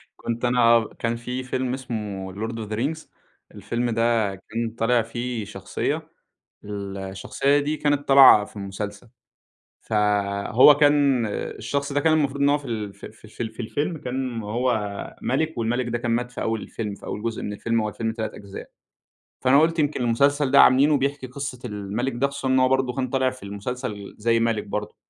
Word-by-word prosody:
كنت 120 Hz, +1 st, -3 dB
أنا 115 Hz, -2 st, +4 dB
كان 115 Hz, 0 st, 0 dB
في 125 Hz, +2 st, -5 dB
فيلم 130 Hz, 0 st, -2 dB
اسمه 105 Hz, -7 st, -5 dB
Lord 110 Hz, +4 st, -4 dB
of 110 Hz, -2 st, -6 dB
the -, -, -1 dB
Rings، 150 Hz, +8 st, -3 dB, 0.5 s
الفيلم 120 Hz, +1 st, -2 dB
ده 115 Hz, -3 st, +1 dB
كان 115 Hz, +4 st, -4 dB
طالع 120 Hz, +1 st, +3 dB
فيه 120 Hz, 0 st, -4 dB
شخصية، 95 Hz, -2 st, -4 dB, 0.5 s
الشخصية 100 Hz, +6 st, -1 dB
دي 145 Hz, +2 st, -1 dB
كانت 145 Hz, -1 st, 0 dB
طالعة 135 Hz, -6 st, +8 dB
في 105 Hz, -, -16 dB
المسلسل، 105 Hz, +3 st, -6 dB, 0.7 s
فهو 105 Hz, +5 st, +4 dB
كان 145 Hz, -4 st, +3 dB
الشخص 140 Hz, +6 st, -3 dB
ده، 145 Hz, -, +1 dB
كان 160 Hz, +1 st, +3 dB
المفروض 140 Hz, -3 st, +1 dB
إن 140 Hz, -, +5 dB
هو 145 Hz, +1 st, +3 dB
في 145 Hz, -, -14 dB
ال 110 Hz, -5 st, -4 dB
في -, -, -10 dB
في 110 Hz, -, -22 dB
ال -, -, -11 dB
في -, -, -18 dB
ال 110 Hz, -, -3 dB
في 110 Hz, -, -11 dB
الفيلم 145 Hz, +8 st, -2 dB
كان 130 Hz, -4 st, -3 dB
هو 120 Hz, +5 st, 0 dB, 0.5 s
مَلِك 155 Hz, +3 st, -1 dB
والمَلِك 120 Hz, +2 st, 0 dB
ده 120 Hz, 0 st, -1 dB
كان 120 Hz, 0 st, -2 dB
مات 120 Hz, +1 st, 0 dB
في 125 Hz, -, -7 dB
أول 115 Hz, -1 st, -1 dB
الفيلم، 105 Hz, -3 st, -5 dB
في -, -, -13 dB
أول 105 Hz, -, -5 dB
جزء 115 Hz, -1 st, -3 dB
من 105 Hz, -, -4 dB
الفيلم، 115 Hz, +2 st, -1 dB
هو 110 Hz, -, -1 dB
الفيلم 110 Hz, +1 st, -3 dB
3 110 Hz, -1 st, -4 dB
أجزاء، 100 Hz, -1 st, -10 dB, 0.7 s
فأنا 130 Hz, +2 st, +5 dB
قُلت 165 Hz, +1 st, +2 dB
يمكن 145 Hz, -3 st, 0 dB
المسلسل 140 Hz, +4 st, +2 dB
ده 140 Hz, -, +8 dB
عاملينه 145 Hz, +3 st, +5 dB
بيحكي 140 Hz, -1 st, -2 dB
قصة 130 Hz, 0 st, -6 dB
المَلِك 105 Hz, +4 st, -3 dB
ده 135 Hz, +3 st, +1 dB
خصوصًا 140 Hz, -1 st, -5 dB
إن 130 Hz, 0 st, +3 dB
هو 130 Hz, 0 st, +4 dB
برضه 130 Hz, -1 st, +1 dB
كان 130 Hz, -1 st, -2 dB
طالع 130 Hz, 0 st, +1 dB
في 130 Hz, -2 st, -12 dB
المسلسل 105 Hz, +1 st, -6 dB
زي 115 Hz, +1 st, +2 dB
مَلِك 115 Hz, -2 st, 0 dB
برضه، 105 Hz, +1 st, -5 dB
120 Hz, 190 wpm, -24 LUFS, 110-135 Hz, 0.7 s, طالعة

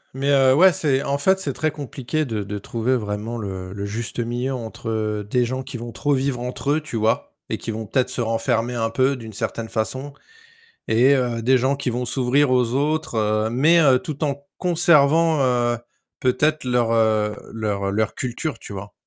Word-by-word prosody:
Mais 135 Hz, +1 st, -1 dB
heu, 135 Hz, -2 st, +5 dB
ouais, 185 Hz, +4 st, +6 dB
c'est 140 Hz, -5 st, +1 dB
en 140 Hz, 0 st, -1 dB
fait, 190 Hz, +6 st, +3 dB
c'est 145 Hz, -7 st, -2 dB
très 155 Hz, +4 st, 0 dB
compliqué 145 Hz, +1 st, -3 dB
de 110 Hz, -5 st, -3 dB
de 100 Hz, +1 st, -5 dB
trouver 115 Hz, +5 st, -1 dB
vraiment 105 Hz, +1 st, -3 dB
le 95 Hz, -3 st, -6 dB
le 100 Hz, 0 st, -5 dB
juste 115 Hz, +4 st, -4 dB
milieu 120 Hz, +3 st, -2 dB
entre 110 Hz, -3 st, -3 dB
des 125 Hz, +1 st, +2 dB
gens 130 Hz, +2 st, -3 dB
qui 130 Hz, -1 st, -7 dB
vont 120 Hz, 0 st, -7 dB
trop 145 Hz, +5 st, 0 dB
vivre 130 Hz, -1 st, -1 dB
entre 125 Hz, +3 st, -3 dB
eux, 155 Hz, +2 st, +1 dB
tu 150 Hz, -5 st, -8 dB
vois? 110 Hz, +1 st, 0 dB, 0.2 s
Et -, -, 0 dB
qui -, -, -7 dB
vont 110 Hz, 0 st, -5 dB
peut-être 125 Hz, +4 st, 0 dB
se -, -, -4 dB
renfermer 115 Hz, +1 st, 0 dB
un 115 Hz, -2 st, -1 dB
peu 130 Hz, +4 st, +1 dB
d'une 115 Hz, -3 st, -9 dB
certaine 110 Hz, +2 st, -4 dB
façon. 130 Hz, +6 st, -3 dB, 0.8 s
Et 125 Hz, +5 st, +5 dB
heu, 120 Hz, -3 st, -1 dB
des 130 Hz, +3 st, +4 dB
gens 135 Hz, +3 st, +1 dB
qui 140 Hz, -2 st, -2 dB
vont 125 Hz, +1 st, -2 dB
s'ouvrir 130 Hz, +3 st, +2 dB
aux 125 Hz, -2 st, +2 dB
autres, 155 Hz, +1 st, 0 dB
heu, 110 Hz, 0 st, +1 dB
mais 150 Hz, +8 st, +4 dB
heu, 135 Hz, -5 st, +5 dB
tout 155 Hz, -1 st, -4 dB
en 140 Hz, -1 st, -3 dB
conservant, 165 Hz, -2 st, +4 dB
heu, 120 Hz, -1 st, +1 dB, 0.4 s
peut-être 145 Hz, +4 st, +1 dB
leur, 120 Hz, -2 st, +1 dB
heu, 110 Hz, -2 st, +2 dB, 0.2 s
leur 100 Hz, -3 st, -2 dB
leur 110 Hz, +1 st, 0 dB
culture, 130 Hz, +5 st, -3 dB
tu -, -, -10 dB
vois? 100 Hz, +1 st, -8 dB
125 Hz, 200 wpm, -22 LUFS, 110-140 Hz, 0.8 s, ouais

